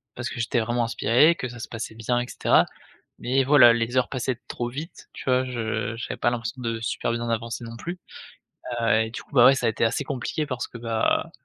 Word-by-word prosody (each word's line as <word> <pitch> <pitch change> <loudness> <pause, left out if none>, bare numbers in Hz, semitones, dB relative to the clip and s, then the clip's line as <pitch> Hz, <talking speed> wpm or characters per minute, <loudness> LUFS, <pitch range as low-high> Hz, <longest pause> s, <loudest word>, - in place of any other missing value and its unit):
parce 120 0 -4
que - - -7
j'étais 115 +1 0
vraiment 120 +2 0
inspiré, 120 +8 +4
que 130 - -4
ça 120 0 -10
se 110 - -7
passait 110 -1 -6
bien 120 +2 0
et 120 - -3
cetera. - - +3 0.5
Mais 135 +2 +1
voilà, 130 -4 +7
les 115 +1 -1
heures 130 - +2
passaient 125 -1 -2
trop 120 0 -3
vite, 150 +8 -8
tu - - -9
vois? 130 0 +2
Je 115 -3 -3
j'avais 120 - -5
pas - - +2
l'impression 120 +1 -4
de 115 -2 -3
super 115 - -2
bien 120 0 -3
avancer 115 +1 -3
non 115 0 -8
plus, 175 +9 -6 0.8
heu, 115 - +3
et - - -8
du 115 - -7
coup, - - -27
bah, 125 -3 +8
ouais 135 - +8
ça 125 - -1
a - - +4
été 110 - -5
assez 120 +5 0
compliqué 140 +3 -3
parce 125 -2 -4
que, - - -11
bah, 115 -1 0
120 Hz, 235 wpm, -25 LUFS, 115-130 Hz, 0.8 s, bah